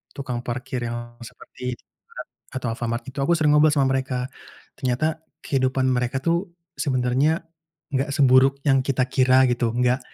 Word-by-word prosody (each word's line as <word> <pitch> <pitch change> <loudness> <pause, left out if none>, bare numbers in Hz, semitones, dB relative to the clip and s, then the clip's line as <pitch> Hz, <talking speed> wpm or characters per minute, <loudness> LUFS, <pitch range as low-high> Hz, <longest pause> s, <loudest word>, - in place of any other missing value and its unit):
tukang 130 -3 -4
parkir 125 0 -4
yang 120 0 -7
seperti 125 +1 -7
Indomaret - - -13 0.3
atau 130 -2 -3
Alfamart, 120 +1 -3
itu 140 - -8
aku 155 +5 +2
sering 155 -2 +3
ngobrol 150 0 +5
sama 135 -2 +2
mereka. 130 -1 -2 0.5
Ternyata, 140 +5 0 0.2
kehidupan 130 -1 0
mereka 125 +1 -1
tuh 170 +3 +1 0.3
sebenarnya 135 +4 +1 0.5
nggak 135 +2 0
seburuk 135 -1 +5
yang 135 -1 +5
kita 130 -2 +1
kira, 130 -1 +5
gitu. 120 -1 0
Enggak 125 +1 +2
130 Hz, 150 wpm, -23 LUFS, 125-140 Hz, 0.5 s, ngobrol